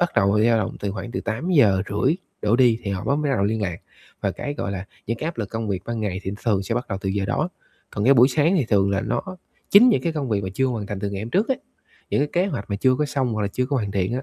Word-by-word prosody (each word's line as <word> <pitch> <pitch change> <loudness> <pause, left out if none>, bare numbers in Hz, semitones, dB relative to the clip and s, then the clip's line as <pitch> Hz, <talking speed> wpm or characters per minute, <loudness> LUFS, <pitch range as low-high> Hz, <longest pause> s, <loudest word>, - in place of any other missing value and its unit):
bắt 175 -1 +1
đầu 100 +2 +4
dao 115 0 +4
động 95 - -2
từ 100 - -2
khoảng 105 +4 -6
từ - - -2
8:30 115 - +2 0.3
đổ 105 +3 +3
đi 120 -3 +4
thì 100 - -3
họ 95 -2 -3
bắt 140 - +1
mới 150 -2 0
bắt 135 - +1
đầu 100 - +1
liên 110 +1 0
lạc, 90 -3 -2 0.4
và - - 0
cái, 145 - -5
gọi 100 -8 -3
là, 95 0 -4 0.2
những 115 +1 -1
cái - - -4
áp 165 -6 -4
lực 105 -3 -2
công 115 -1 -3
việc 95 -2 -2
ban 120 -1 -3
ngày 95 -3 -2
thì 95 - -3
nó 100 - -6
thường 100 -4 +2
sẽ 115 +4 -2
bắt 125 - -3
đầu 95 -2 -3
từ 95 - -3
giờ 100 0 0
đó. 155 - 0 0.4
Còn 105 - -2
cái 135 +3 +6
buổi 125 +1 +7
sáng 150 +7 +2
thì 145 - +2
thường 100 -2 +3
là 100 - +1
nó - - -1 0.5
chính 225 +6 +8
những 225 - +3
cái 165 -2 0
công 145 -5 -3
việc 105 -2 +1
mà - - -2
chưa 130 +4 +2
hoàn 115 -5 -3
thành 100 -1 -5
từ 100 -1 -2
ngày 100 +1 -4
hôm 115 - -6
trước 205 +7 +1
á, 265 - +3 0.6
những - - +2
cái 145 - +1 0.2
kế - - 0
hoạch 100 - -5
mà 100 - 0
chưa 130 +4 +3
có 150 +2 0
xong, 130 -4 -1
hoặc 110 - -1
là 100 - 0
chưa 125 +5 -1
có 140 0 0
hoàn 105 -5 -1
thiện 95 +3 0
á, 130 - -2
110 Hz, 320 wpm, -23 LUFS, 100-135 Hz, 0.6 s, chính